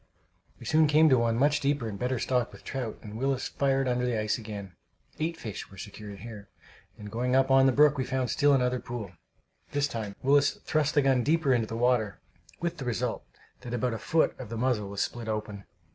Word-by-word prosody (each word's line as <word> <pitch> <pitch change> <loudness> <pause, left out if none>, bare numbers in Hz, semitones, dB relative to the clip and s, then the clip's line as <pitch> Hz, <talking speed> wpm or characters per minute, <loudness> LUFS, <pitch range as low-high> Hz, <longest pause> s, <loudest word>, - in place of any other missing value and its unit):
We - - -11
soon 155 0 +4
came 155 +2 +5
to 130 -3 +5
one 115 -1 +1
much 145 +3 +3
deeper 140 -4 0
and 100 -2 -6
better 125 +1 0
stocked 125 -1 0
with - - -14
trout, 125 -5 -4
and 105 +1 -8
Willis 135 0 -1
fired 135 -1 +1
under 125 0 0
the 120 -3 0
ice 105 +2 0
again. 100 -4 -7 0.5
Eight 165 +1 -1
fish 110 -9 -7
were 95 - -14
secured 105 0 -9
here; 105 -3 -9 0.5
and 105 -1 -9
going 125 +2 0
on 135 0 +5
up 135 0 +6
the - - +5
brook, 145 +1 +4
we - - +1
found 130 -1 -1
still 145 -1 +4
another 125 -1 +1
pool. 115 -7 -6 0.6
This 145 0 +2
time 110 -6 -5
Willis 145 +1 +4
thrust 150 -2 +1
the 145 - +4
gun 135 -2 +3
deeper 155 -2 +2
into 115 -3 +1
the 115 - -5
water, 120 -4 +1 0.4
with 170 0 -2
the 135 - -6
result 120 -5 -2 0.4
that 120 -1 -5
about 120 0 0
a 115 - -4
foot 165 0 +2
of - - -7
the 115 - -5
muzzle 115 -4 0
was 100 0 -1
split 120 -2 -5
open! 105 -2 -4
125 Hz, 220 wpm, -28 LUFS, 110-140 Hz, 0.6 s, up